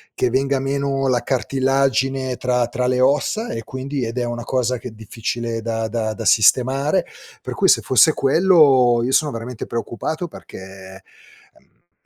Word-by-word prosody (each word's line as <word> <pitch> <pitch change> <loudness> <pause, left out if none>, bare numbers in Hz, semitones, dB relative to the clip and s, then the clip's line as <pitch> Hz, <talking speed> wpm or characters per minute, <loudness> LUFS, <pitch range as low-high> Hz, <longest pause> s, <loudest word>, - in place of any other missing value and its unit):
che 125 - 0
venga 135 +2 0
meno 135 0 -1
la 125 -1 +1
cartilagine 135 0 0
tra 125 -1 0
tra 125 +1 -2
le 125 0 +1
ossa 145 - +1
e 115 - -5
quindi 130 0 -4
ed 115 +2 -6
è 125 - 0
una 120 0 -5
cosa 125 -1 -1
che 125 - -9
è - - -15
difficile 115 +1 -5
da 115 0 -3
da 110 -1 -2
da 115 - -7
sistemare, 135 - +3 0.4
per - - -6
cui - - +2
se - - +4
fosse 145 +4 +4
quello 135 -6 +4
io 130 - -1
sono 150 +1 +2
veramente 115 0 -6
preoccupato 120 - -4
perché 95 -5 -12 0.5
ehm, 90 +4 -33
125 Hz, 165 wpm, -20 LUFS, 115-135 Hz, 0.5 s, se